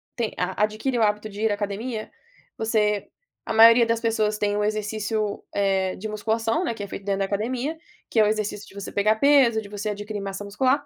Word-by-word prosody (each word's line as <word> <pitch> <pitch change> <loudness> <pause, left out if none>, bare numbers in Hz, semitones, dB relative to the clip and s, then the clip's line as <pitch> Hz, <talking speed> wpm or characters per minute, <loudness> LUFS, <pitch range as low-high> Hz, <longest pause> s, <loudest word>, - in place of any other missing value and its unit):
tem 230 -3 -2
adquire 215 +7 -1
o - - +4
hábito 210 0 0
de 205 +1 -8
ir 220 - +2
à - - +1
academia, 215 +3 -4 0.5
você 210 -2 0 0.4
a - - -2
maioria 230 +2 +8
das 230 0 0
pessoas 220 -2 0
tem 205 -1 0
um 210 - 0
exercício, 215 0 -2
eh, 195 -2 +1
de 220 - -5
musculação, 225 - -1
né, 285 - -1
que 210 - -6
é - - -5
feito 195 - -7
dentro 200 -1 0
da 195 - +1
academia, 245 +10 -2 0.3
que 225 - +1
é - - +7
o 210 - +3
exercício 210 -1 -2
de - - -15
você 200 0 -6
pegar 215 +2 +2
peso, 270 -4 +5
de 200 - -11
você 205 +1 -4
adquirir 205 0 -5
massa 195 +1 -5
muscular, 255 +8 +1
215 Hz, 215 wpm, -24 LUFS, 205-225 Hz, 0.5 s, maioria